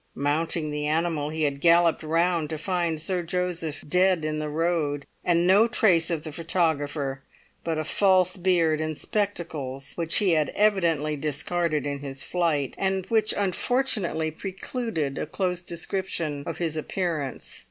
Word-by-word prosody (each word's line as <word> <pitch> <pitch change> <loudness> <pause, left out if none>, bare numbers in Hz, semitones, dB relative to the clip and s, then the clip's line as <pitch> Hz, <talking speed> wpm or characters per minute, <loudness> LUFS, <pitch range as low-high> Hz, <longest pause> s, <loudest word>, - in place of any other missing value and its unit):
Mounting 155 +2 0
the 150 0 -2
animal, 155 -1 0
he 160 0 -2
had 140 -1 -1
galloped 170 0 +4
round 165 0 +1
to 155 - -3
find 170 -1 -1
Sir 180 +3 0
Joseph 175 -3 -2
dead 180 0 +3
in 155 0 -2
the 155 0 -3
road, 150 -3 0 0.2
and 175 -1 +3
no 200 +5 +6
trace 185 -8 +3
of 165 -3 -2
the 155 - -4
"photographer" 145 -4 -1 0.4
but 165 -1 -1
a 155 - -1
false 185 +2 +3
beard 170 -4 +2
and 155 -1 -3
spectacles 155 -10 -3
which 170 -1 +1
he 200 -4 +4
had 155 -2 +2
evidently 170 -8 +2
discarded 155 +1 -1
in 140 -1 -2
his 135 -1 -5
flight, 160 -6 0
and 190 -1 0
which 220 -1 +3
unfortunately 200 -5 0
precluded 185 - -4
a - - -3
close 180 -2 -1
description 170 -4 -3
of 165 - -4
his 165 -2 -1
appearance. 155 -3 -3
165 Hz, 150 wpm, -26 LUFS, 150-180 Hz, 0.4 s, no